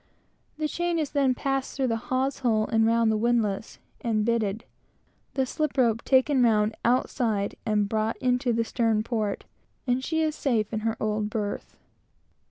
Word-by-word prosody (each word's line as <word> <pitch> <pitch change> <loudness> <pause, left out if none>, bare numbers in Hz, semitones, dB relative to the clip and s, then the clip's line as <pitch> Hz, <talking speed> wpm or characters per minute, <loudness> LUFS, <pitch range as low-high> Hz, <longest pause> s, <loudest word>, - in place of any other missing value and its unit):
The 310 0 0
chain 345 +2 -1
is 305 -3 -1
then 275 -3 +2
passed 270 +1 -2
through 265 -2 +1
the 230 - +1
hawse 260 +1 0
hole 225 -4 +2
and 225 0 +2
round 230 -1 +3
the 215 - +1
windlass, 225 -2 0 0.3
and 215 -3 +1
bitted, 220 -2 0 0.7
the 265 -1 +2
slip 295 +1 -2
rope 230 -3 +2
taken 265 0 +3
round 215 -2 +3
outside 230 -4 +1
and 210 -1 +2
brought 220 +1 -1
into 250 0 +1
the 230 0 +1
stern 225 -2 +1
port, 215 -4 -2 0.4
and 250 0 0
she 320 +2 0
is 310 -1 0
safe 230 -8 -1
in 220 - 0
her 225 +1 -2
old 210 0 -1
berth. 205 -2 -4
230 Hz, 170 wpm, -26 LUFS, 215-260 Hz, 0.7 s, round